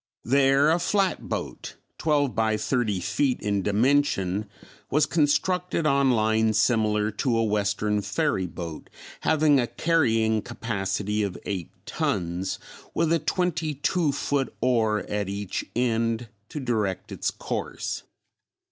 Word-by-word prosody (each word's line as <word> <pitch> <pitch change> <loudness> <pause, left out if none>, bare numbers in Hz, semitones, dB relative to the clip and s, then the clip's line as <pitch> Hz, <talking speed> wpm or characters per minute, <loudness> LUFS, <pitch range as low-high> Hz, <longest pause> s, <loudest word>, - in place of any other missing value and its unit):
There 135 +3 +4
a 170 - +2
flatboat, 190 +2 -1 0.2
twelve 145 -5 +2
by 110 0 +1
thirty 110 -3 0
feet 110 +9 0
in 100 -1 0
dimension, 105 -3 +1 0.4
was 150 +2 +3
constructed 170 +3 +1
on 140 -2 +3
lines 110 -2 +2
similar 105 -2 +2
to 115 +3 0
a 115 - +2
western 105 0 0
ferry 100 - 0
boat, 85 -2 -7 0.3
having 155 -3 +3
a 120 - +1
carrying 115 -11 +2
capacity 105 -1 -2
of 100 -3 -2
eight 95 -5 -3 0.2
tons 90 0 -2 0.4
with 165 0 +2
a 165 - +3
twenty 160 -1 -1
two 155 +2 +1
foot 140 -1 -1
oar 110 -4 +2
at 105 -2 -2
each 100 -1 -3
end 115 -1 0 0.2
to 150 - -5
direct 110 -8 -2
its - - -1
course. - - -4
115 Hz, 125 wpm, -26 LUFS, 105-145 Hz, 0.4 s, There